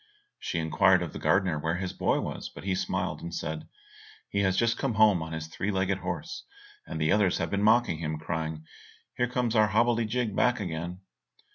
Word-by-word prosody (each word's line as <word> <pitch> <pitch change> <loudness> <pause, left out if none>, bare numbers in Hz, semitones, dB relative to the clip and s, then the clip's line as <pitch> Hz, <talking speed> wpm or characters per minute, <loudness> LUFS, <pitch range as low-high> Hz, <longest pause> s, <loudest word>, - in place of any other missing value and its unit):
She - - -3
inquired 80 -2 +3
of - - -6
the - - -6
gardener 90 -6 +2
where 80 +2 -1
his 90 +1 -3
boy - - +1
was, - - -5
but - - -11
he 95 0 0
smiled, 95 - -2
and 85 - -6
said, 80 -2 -4 0.6
"He 100 - 0
has 95 -2 +2
just 115 0 +3
come 135 -5 -2
home 105 -5 +5
on 80 0 -5
his 80 -1 -4
three 80 +5 -4
legged 95 -1 0
horse, 390 - -5 0.4
and - - -5
the 80 +2 +2
others 100 -3 +3
have - - -2
been 100 0 0
mocking 110 -6 +3
him, 80 -1 -2
and 75 - -5
crying, 80 -1 -4 0.5
"Here 125 - +1
comes 120 -2 -1
our 110 -1 +5
hobblety 115 +2 +2
jig 115 -2 -1
back 125 -1 +3
again!" 90 -1 -4
95 Hz, 210 wpm, -28 LUFS, 80-110 Hz, 0.6 s, home